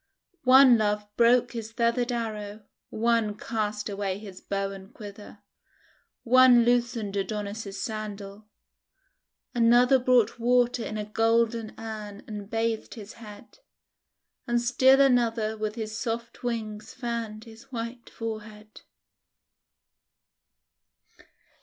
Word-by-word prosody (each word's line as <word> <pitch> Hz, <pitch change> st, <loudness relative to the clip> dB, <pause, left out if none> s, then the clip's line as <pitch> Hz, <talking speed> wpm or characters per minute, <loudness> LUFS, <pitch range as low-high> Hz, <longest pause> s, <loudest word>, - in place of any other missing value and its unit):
One 255 Hz, -2 st, +7 dB
Love 210 Hz, -1 st, 0 dB
broke 240 Hz, +1 st, +4 dB
his 225 Hz, -2 st, -6 dB
feathered 235 Hz, +2 st, 0 dB
arrow, 215 Hz, -3 st, -4 dB, 0.3 s
one 225 Hz, -2 st, 0 dB
cast 210 Hz, -2 st, -3 dB
away 200 Hz, -2 st, -3 dB
his 200 Hz, -3 st, -11 dB
bow 195 Hz, 0 st, -3 dB
and 195 Hz, +1 st, -11 dB
quiver, 205 Hz, -2 st, -11 dB, 0.8 s
one 250 Hz, -1 st, +6 dB
loosened 235 Hz, -4 st, 0 dB
Adonis' 200 Hz, 0 st, -4 dB
sandal, 210 Hz, -1 st, -6 dB, 1.1 s
another 245 Hz, +2 st, +5 dB
brought 245 Hz, -3 st, +2 dB
water 245 Hz, 0 st, +2 dB
in 215 Hz, -, -5 dB
a 210 Hz, -, -3 dB
golden 225 Hz, +1 st, +1 dB
urn 215 Hz, -2 st, -7 dB
and 210 Hz, -2 st, -8 dB
bathed 225 Hz, 0 st, -2 dB
his 215 Hz, -2 st, -10 dB
head, 210 Hz, -, -13 dB, 0.9 s
and 240 Hz, 0 st, +2 dB
still 260 Hz, +3 st, +4 dB
another 230 Hz, -4 st, +2 dB
with 215 Hz, 0 st, -4 dB
his 220 Hz, -2 st, -5 dB
soft 230 Hz, +1 st, -4 dB
wings 220 Hz, -3 st, -5 dB
fanned 230 Hz, -4 st, -4 dB
his 225 Hz, +2 st, -15 dB
white 235 Hz, 0 st, -6 dB
forehead. 215 Hz, -1 st, -8 dB
225 Hz, 110 wpm, -27 LUFS, 210-235 Hz, 1.1 s, One